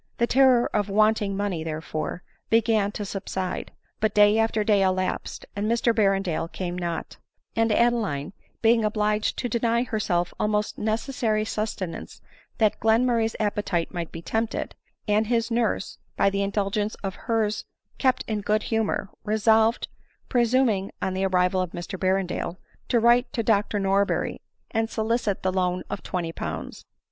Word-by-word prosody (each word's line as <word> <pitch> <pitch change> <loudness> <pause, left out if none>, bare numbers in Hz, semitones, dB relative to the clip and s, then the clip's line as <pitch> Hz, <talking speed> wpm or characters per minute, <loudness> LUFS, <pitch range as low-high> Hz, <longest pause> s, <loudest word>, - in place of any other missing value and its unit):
The 235 - +3
terror 255 -1 +5
of 205 -1 +1
wanting 210 -1 +2
money, 195 -5 -2
therefore, 155 +2 -4 0.3
began 225 -2 +3
to 205 - -4
subside; 190 -2 -4 0.3
but 215 -1 0
day 210 +1 +6
after 225 -1 +1
day 205 -2 +3
elapsed, 185 -1 -1
and 205 +2 -1
Mr 235 0 +2
Berrendale 195 -6 +1
came 175 -2 -4
not; 170 -2 -4 0.4
and 225 0 +2
Adeline, 210 -9 +1 0.3
being 225 0 +5
obliged 210 0 0
to 245 - -1
deny 235 0 +1
herself 180 -7 -1
almost 210 0 0
necessary 220 -1 0
sustenance 210 -6 -4 0.4
that 215 -2 +2
Glenmur 230 +2 +3
ray's 225 0 0
appetite 205 -5 -1
might 170 -2 -4
be 165 - -8
tempted, 225 +3 -2 0.3
and 210 +1 +2
his 230 0 0
nurse, 230 -4 -1 0.2
by 200 - +3
the 200 0 -1
indulgence 200 +1 -1
of 195 -1 -2 0.2
hers, 220 -2 0 0.3
kept 260 -2 +2
in 215 -2 -1
good 215 +1 +1
humor, 220 -2 0
resolved, 220 +1 +3 0.4
pre 245 - +3
suming 230 -5 +2
on 190 - -1
the 190 +1 0
arrival 185 0 +2
of 180 -2 -4
Mr 175 +2 -6
Berrendale, 185 -2 -1 0.3
to 240 - +3
write 240 +2 +4
to 235 -5 -1
Dr 205 -1 +2
Norberry 195 +1 +1 0.3
and 225 0 0
solicit 220 -3 -1
the 185 0 +1
loan 180 -1 0
of - - -3
twenty 175 -3 -3
pounds. - - -6
210 Hz, 155 wpm, -25 LUFS, 190-225 Hz, 0.4 s, day